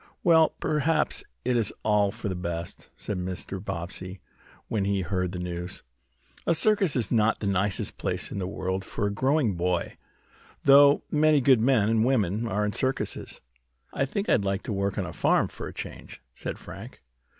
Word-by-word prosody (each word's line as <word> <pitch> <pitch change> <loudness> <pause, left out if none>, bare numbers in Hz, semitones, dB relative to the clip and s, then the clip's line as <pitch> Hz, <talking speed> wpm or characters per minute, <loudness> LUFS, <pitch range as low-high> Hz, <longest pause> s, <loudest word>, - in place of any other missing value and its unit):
"Well, 160 -2 +5
perhaps 155 +1 0 0.2
it 125 0 +1
is 115 -4 +1
all 105 -2 +3
for 110 0 -6
the 95 - -1
best," 85 -1 -5
said 100 - -3
Mr. 95 +1 -5
Bobbsey, 90 +1 -5 0.5
when 105 -3 -1
he 100 0 0
heard 90 0 -1
the 90 - -5
news. 90 0 -5 0.6
"A 170 - +4
circus 200 -1 +3
is 115 -6 0
not 110 -1 +2
the - - -4
nicest 100 0 0
place - - -2
in - - -4
the 90 - -2
world 95 0 -3
for 100 - -3
a 100 - 0
growing 130 0 +2
boy, 90 0 -1 0.7
though 140 +1 +7
many 155 0 +4
good 130 -3 +4
men 120 -4 +3
and 110 0 +3
women 115 -3 +1
are 105 -1 0
in 105 - -2
circuses." 130 0 -2 0.5
"I 135 - +1
think 200 +9 -3
I'd 100 - +3
like 95 0 -1
to 110 - -3
work 100 0 -1
on 95 - -1
a 90 - -7
farm - - +2
for - - -7
a - - -8
change," - - -8
said - - -5
Frank. - - -11
105 Hz, 185 wpm, -27 LUFS, 95-130 Hz, 0.7 s, though